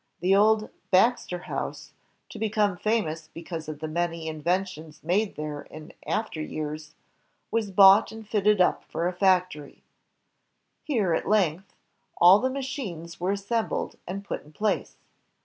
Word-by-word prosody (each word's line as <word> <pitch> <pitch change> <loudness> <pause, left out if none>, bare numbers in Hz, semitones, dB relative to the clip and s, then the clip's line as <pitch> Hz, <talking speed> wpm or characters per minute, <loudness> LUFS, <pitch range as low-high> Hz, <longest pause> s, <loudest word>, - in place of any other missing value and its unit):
The 185 +3 +2
old 215 +1 +3 0.2
"Baxter 190 -1 +3
House," - - -5 0.4
to - - -9
become 210 -3 +1
famous 175 -6 -1
be 165 +1 -11
cause 160 -2 -6
of 150 -1 -7
the 155 - -3
many 165 0 -2
inventions 160 0 -3
made 195 +6 0
there 150 -1 -5
in 155 0 -12
after 165 -1 -2
years, 155 0 -5 0.6
was 225 -3 0
bought 195 +2 +7
and 220 -1 -10
fitted 210 -1 +2
up 180 - +3
for 170 - -2
a 180 - -2
factory. 180 -5 0 1.0
Here, 220 - 0
at - - -1
length, 190 -3 +1 0.4
all 180 +4 +8
the 260 - 0
machines 255 - -5
were 185 +3 0
assembled 210 +3 -2
and 195 +3 -5
put - - -5
in 150 - -18
place. 210 +6 -1
185 Hz, 150 wpm, -26 LUFS, 160-210 Hz, 1.0 s, all